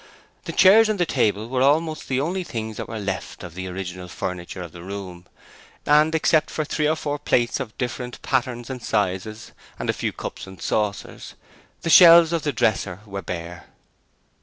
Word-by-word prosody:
The - - -4
chairs 215 +3 +6
and 210 -3 -1
the 175 - +3
table 110 -7 0
were 130 +1 -1
almost 155 +3 +1
the 130 -1 0
only 180 +6 -1
things 110 -8 -5
that - - -5
were 115 - -5
left 95 -3 -5
of 90 -2 -9
the 95 +1 -6
original 90 -1 -6
furniture 90 0 -5
of 85 - -9
the 85 - -11
room, 90 -2 -8 0.6
and 150 +2 +4
except 155 0 +2
for 155 - -3
three 150 0 0
or 155 - +2
four 145 -2 -3
plates 120 -2 +1
of 120 -5 -6
different 125 -1 -4
patterns 125 -2 -1
and 130 -2 -6
sizes 105 0 -2 0.3
and - - -1
a - - -8
few - - -2
cups - - -7
and 95 -1 -12
saucers, 105 -2 -3 0.5
the 165 - 0
shelves 170 -1 +8
of 165 - 0
the 150 0 -1
dresser 100 -6 0
were 100 -1 -6
bare. 85 -1 -7
120 Hz, 185 wpm, -23 LUFS, 95-150 Hz, 0.6 s, shelves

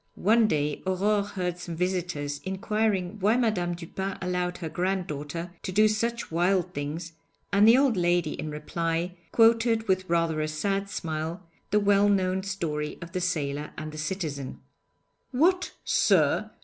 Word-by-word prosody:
One 220 +3 +4
day 150 -5 -1
Aurore 200 +3 +2
heard 180 -3 -3
some 175 -2 -6
visitors 175 -5 -2
inquiring 195 0 -1
why 210 +5 +3
Madame 195 -8 0
Dupin 190 +3 -5
allowed 180 -1 -2
her 170 - -5
granddaughter 170 -2 -3
to 190 - -4
do 215 +3 +5
such 230 +1 -1
wild 175 +2 +1
things, 155 +4 -4 0.4
and 205 +2 +6
the 230 +3 +8
old 270 -4 +3
lady 175 -3 +2
in 155 - -5
reply 165 +3 -2 0.2
quoted 230 -1 +4
with 185 -1 +1
rather 165 -2 +1
a 155 - 0
sad 195 +6 -1
smile 160 +1 -4 0.2
the 210 - +3
well 205 0 +4
known 190 -1 +1
story 165 -7 -3
of 170 0 -9
the 185 0 -2
sailor 150 -4 -2
and 155 0 -5
the 155 - -8
citizen. 155 -5 -4 0.7
'What, 355 +8 +2
sir! - - +3
180 Hz, 150 wpm, -27 LUFS, 165-200 Hz, 0.7 s, the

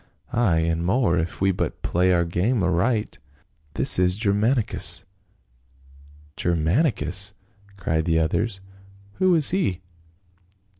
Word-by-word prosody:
Ay, 115 -9 +2
and 80 0 -1
more, 95 0 +2
if 80 +3 -4
we 95 0 +3
but 90 - -4
play 90 +2 +1
our 85 -1 +2
game 95 +7 0
aright. 105 +6 0 0.6
This - - +3
is 90 +2 +2
Gcrmanicus." 110 +3 0 0.6
" 70 +3 -26
Germanicus 90 - -1 0.2
!" 100 0 -26
cried 80 -4 -1
the 80 -2 +1
others. 95 +6 -1 0.6
"Who 185 -2 +4
is 155 -4 +5
he 145 - -1
90 Hz, 120 wpm, -23 LUFS, 80-110 Hz, 0.6 s, is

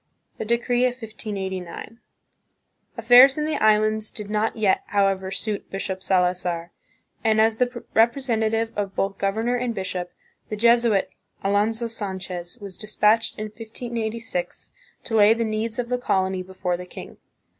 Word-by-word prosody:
The - - -3
Decree 240 +2 +1
of 250 - +1
1589. 205 -2 -6 1.0
Affairs 245 +4 +7
in 300 - 0
the 310 -1 -1
Islands 215 0 +3
did 210 -1 -8
not 215 +1 0
yet, 210 -4 +2
however, 195 -2 +1
suit 205 +2 -3
Bishop 190 -1 -4
Salazar, 180 -2 0 0.5
and 220 -1 +3
as 220 0 +3
the 250 - +4 0.3
representa 230 -1 +2
tive 225 +1 -1
of 200 -2 -3
both 195 0 -1
governor 220 +5 0
and 245 -2 -2
bishop, 185 -2 -4 0.4
the 215 - -2
Jesuit, 235 -2 +3 0.3
Alonso 215 +4 +1
Sanchez, 190 -4 -5
was 200 -3 -8
dispatched 215 +1 +2
in 215 - -4
1586 230 - -5 0.3
to 225 - -3
lay 215 +1 +6
the 230 - -1
needs 220 +1 -2
of 240 -1 -2
the 250 0 0
colony 190 -5 0
before 185 -1 -3
the 180 0 -9
king. - - -10
215 Hz, 145 wpm, -24 LUFS, 195-230 Hz, 1.0 s, Affairs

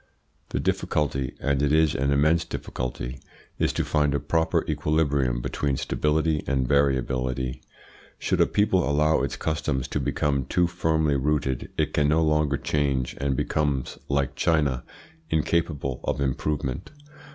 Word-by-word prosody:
The - - -2
difficulty, 70 -4 -1
and 70 -1 0
it 70 -1 +2
is 80 0 +4
an 70 +2 0
immense 75 +4 +3
difficulty, 60 +1 -5 0.4
is - - +2
to - - -1
find 75 -2 +1
a - - +1
proper 80 -1 +1
equilibrium 70 -5 +1
between 70 +2 -1
stability 75 0 0
and 65 -2 +1
variability. 65 -2 0 0.6
Should - - 0
a - - +5
people 95 -7 +2
allow 75 +2 +3
its - - -2
customs 75 -4 -1
to - - -1
become 70 -3 0
too 90 +7 +2
firmly 80 -4 +1
rooted, 70 -2 -1
it - - 0
can 75 -1 +2
no 80 +2 +3
longer 75 -2 +2
change, 70 -4 -1
and 70 -1 +1
becomes, 70 -3 -1
like 70 -2 0
China, 70 -6 +1 0.5
incapable 75 -4 0
of - - -1
improvement. 70 -1 -2
70 Hz, 140 wpm, -25 LUFS, 65-75 Hz, 0.6 s, a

